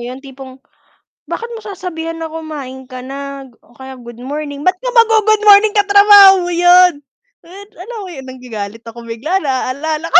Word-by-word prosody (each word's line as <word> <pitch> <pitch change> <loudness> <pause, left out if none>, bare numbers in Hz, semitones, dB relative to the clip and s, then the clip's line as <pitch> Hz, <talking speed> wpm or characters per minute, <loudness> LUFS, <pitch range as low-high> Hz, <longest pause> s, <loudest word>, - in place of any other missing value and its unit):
'yon, 255 +2 -9
tipong, 265 -1 -11 0.7
bakit 465 +1 -6
mo 450 - -8
sasabihan 345 -5 -6
na, 325 0 -6
"Kumain 295 -5 -8
ka 255 -1 -10
na?" 275 0 -8 0.2
o - - -25
kaya 265 0 -10
"Good 240 -1 -13
morning." 285 +1 -6
ba't 365 +4 +1
ka - - -5
mag-gu-good 435 -2 +3
morning, 410 +1 +6
katrabaho 405 -1 +7
mo 355 - -4
'yon? 355 +1 +5 0.5
What? 395 +4 -14
Alam 460 +5 -9
mo - - -9
'yon, 265 -2 -10
nagagalit 225 -4 -8
ako 230 +1 -11
bigla, 275 +12 -2
naaalala 295 +3 -3
ko. 340 - +9
315 Hz, 170 wpm, -15 LUFS, 260-385 Hz, 0.7 s, ko